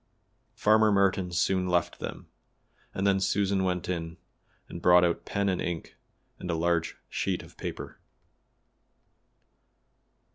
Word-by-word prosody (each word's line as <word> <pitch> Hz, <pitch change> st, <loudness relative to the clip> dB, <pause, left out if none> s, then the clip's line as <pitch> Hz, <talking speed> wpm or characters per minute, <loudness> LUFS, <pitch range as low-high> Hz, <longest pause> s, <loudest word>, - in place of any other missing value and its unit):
Farmer 110 Hz, 0 st, +4 dB
Merton 95 Hz, -2 st, +2 dB
soon 90 Hz, +1 st, +1 dB
left 90 Hz, -1 st, 0 dB
them, -, -, -6 dB, 0.7 s
and 95 Hz, -, -2 dB
then 100 Hz, -1 st, +3 dB
Susan 95 Hz, 0 st, +1 dB
went 90 Hz, -1 st, -1 dB
in 85 Hz, -2 st, -4 dB, 0.5 s
and 85 Hz, -, -8 dB
brought 90 Hz, 0 st, +6 dB
out 85 Hz, -, -1 dB
pen 100 Hz, -1 st, -1 dB
and 95 Hz, -2 st, 0 dB
ink 85 Hz, -2 st, -4 dB, 0.4 s
and 90 Hz, -, -6 dB
a 85 Hz, -, +1 dB
large 85 Hz, 0 st, 0 dB
sheet -, -, -2 dB
of -, -, -16 dB
paper. -, -, -7 dB
90 Hz, 130 wpm, -28 LUFS, 85-100 Hz, 0.7 s, brought